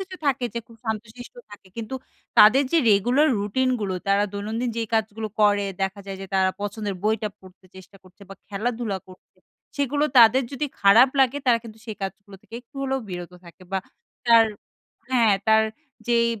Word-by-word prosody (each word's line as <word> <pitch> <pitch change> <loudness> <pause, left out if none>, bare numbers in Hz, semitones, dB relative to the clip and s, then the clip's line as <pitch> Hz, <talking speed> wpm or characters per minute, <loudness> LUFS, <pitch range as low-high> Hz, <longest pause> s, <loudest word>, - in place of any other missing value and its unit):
কিছু 375 -1 -7
থাকে 260 -2 +1
যে - - -1
খুব 230 - -16
শান্তশিষ্ট 220 +2 -6 0.2
থাকে। 205 -2 -14
কিন্তু 230 +3 -5 0.4
তাদের 240 +7 +8
যে 335 - +5
রেগুলার 245 +10 +3
রুটিনগুলো, 210 -1 -1
তারা 200 +1 +3
দৈনন্দিন 220 +4 -3
যেই 230 - -1
কাজগুলো 220 0 -1
করে, 205 -1 +4 0.2
দেখা 195 +1 -2
যায় 195 -1 -6
যে 195 - -7
তারা 190 0 +3
পছন্দের 205 0 -4
বইটা 215 0 0
পড়তে 185 0 -18
চেষ্টা 190 +1 -14
করছে 185 +2 -19
বা 195 - -9
খেলাধুলা 220 -1 -3
করছে। 185 0 -18 0.4
সেইগুলো 285 +1 0
যদি 275 - -16
তাদের 235 +3 +7 0.4
খারাপ 225 +6 +7
লাগে, 265 +1 +3
তারা 235 -2 +4
কিন্তু 225 -1 -11
সেই 220 -2 -6
কাজগুলো 195 +1 -7
থেকে 230 - -14
একটু 245 - -39
হলেও 270 0 -1
বিরত 175 -1 -7
থাকে। 170 +2 -15
বা 195 - +1 0.5
তার 230 -1 +7 0.6
হ্যাঁ, 230 -5 +4
তার 220 0 +5 0.5
যেই 235 -1 +3
220 Hz, 170 wpm, -24 LUFS, 200-240 Hz, 0.6 s, তাদের